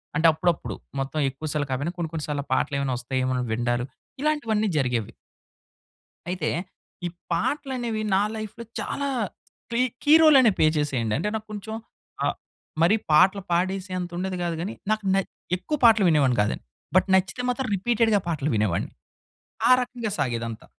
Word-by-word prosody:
అంటే 160 +2 +5
అప్పుడప్పుడు 170 0 -1 0.2
మొత్తం 135 +3 -2
ఎక్కువ 135 +4 -7
సార్లు 145 -1 0
కాపోయినా 145 +6 -1
కొన్ని, 170 -2 -2
కొన్ని 160 -2 -4
సార్లు 145 -1 -1
ఆ - - -41
పాటలేమైనా 140 -1 0
వస్తాఏమో 130 +1 -1
అని 125 - 0
వినడాలు 120 +2 0 0.4
ఇలాంటివన్నీ 230 -9 +1
జరిగేవి. 125 -6 0 1.2
అయితే, 180 -4 -1 0.6
ఈ - - 0 0.2
పాటలు 265 - -1
అనేవి 230 -3 -2
నా 195 - +4
లైఫ్‌లో 215 +2 -6 0.2
చాలా 280 0 -2 0.6
క్లీ 235 +2 +2 0.2
కీ 295 - +4
రోల్ 310 -2 +8
అనే 235 - +6
ప్లే 155 - +5
చేసేయండి. 125 -7 0
అంటే 210 - -1
నాకు 220 0 -4
కొంచెం 220 +1 -6 0.5
ఆహ్, - - +1 0.5
మరి 195 +7 +5
పాటలు 190 +5 +5
పాడేసేంత 185 0 -1
ఉండేది 185 +1 -2
కాదు 170 -1 -1
కానీ 195 +5 -3 0.2
నాకు 215 -1 -1
నే 195 - +4 0.4
ఎక్కువ 300 - -3
పాటలు 220 -4 +7
వినేవాడిని 140 -7 +3
కాదండి. 105 - -2 0.3
బట్ 185 - +5
నచ్చితే 190 +6 +1
మాత్రం 250 -1 -2
రిపీటెడ్‌గా 225 0 +2
పాటలు 155 -3 -1
వినేవాడిని. 105 -5 0 0.8
ఆ - - +7
రకంగా 240 -3 -4
సాగేదంతా. 115 -4 -2
180 Hz, 155 wpm, -25 LUFS, 140-220 Hz, 1.2 s, రోల్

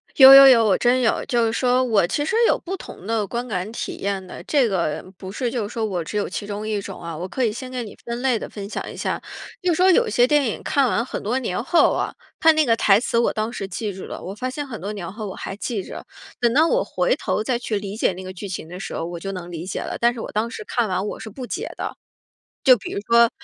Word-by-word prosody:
有 265 -2 +11
有 275 0 +11
有， 235 -4 +7
我 200 -3 +3
真 250 +1 +3
有。 235 - +1
就 240 -4 +1
是 225 - 0
说 250 +1 +2
我 220 -8 +3
其 290 +9 -1
实 445 - -1
有 - - +3
不 375 +2 -5
同 270 - -11
的 220 -1 0
观 240 +5 -4
感 190 -3 -3
体 - - -5
验 195 -1 -3
的， 180 - -10
这 275 -6 +2
个 170 -6 -1
不 190 -1 -8
是 240 +2 -2
就 225 -5 -2
是 - - -11
说 225 -2 -1
我 180 -5 -2
只 210 - -4
有 205 - 0
其 185 +3 -5
中 210 +1 -4
一 210 -2 -1
种 - - -8
啊。 170 -1 -6
我 175 +4 -5
可 255 +7 -2
以 220 - +1
先 255 +4 -7
给 250 -1 -3
你 210 - -10
分 235 +1 -4
类 255 -3 +2
地 - - -6
分 200 -2 -7
享 - - -5
一 - - -10
下， - - -2 0.4
就 360 - +2
是 - - +2
说 370 +1 +5
有 475 +6 +4
一 - - -3
些 245 - +5
电 295 -1 +3
影 220 - -4
看 280 -2 +2
完 235 - 0
很 - - -5
多 230 +5 -1
年 230 -5 -2
后 335 +5 +4
啊， - - -2 0.3
它 320 - +7
那 310 -1 +3
个 230 -3 +3
台 210 -2 +4
词， 235 - -1
我 235 - +2
当 215 +1 -2
时 195 -5 -4
记 205 +2 -4
住 190 - -8
了， - - -7
我 190 - -6
发 255 +5 -4
现 285 +2 -5
很 225 -7 -7
多 200 - -4
年 185 -5 -6
后 215 +1 -6
我 190 - -6
还 195 - -6
记 210 -1 -3
着。 - - -8 0.4
等 235 -1 +3
到 310 +5 +5
我 - - +2
回 - - 0
头 215 - -2
再 240 +1 0
去 220 -3 -2
理 200 0 -5
解 205 - +1
那 185 - -8
个 185 0 -7
剧 195 +2 -7
情 175 -3 -5
的 180 +2 -8
时 - - -6
候， 165 - -3
我 170 0 -6
就 195 +3 -5
能 175 -2 -7
理 170 0 -6
解 185 - -4
了， - - -4
但 240 +1 +3
是 240 - -8
我 - - -6
当 220 +2 -1
时 430 - -7
看 235 - 0
完 185 +1 -1
我 - - -5
是 220 - -7
不 250 +4 -7
解 395 - -4
的。 - - -4 0.7
就 260 -3 +8
比 - - -8
如 - - -2
说 235 0 +6
225 Hz, 315 characters per minute, -22 LUFS, 195-255 Hz, 0.7 s, 有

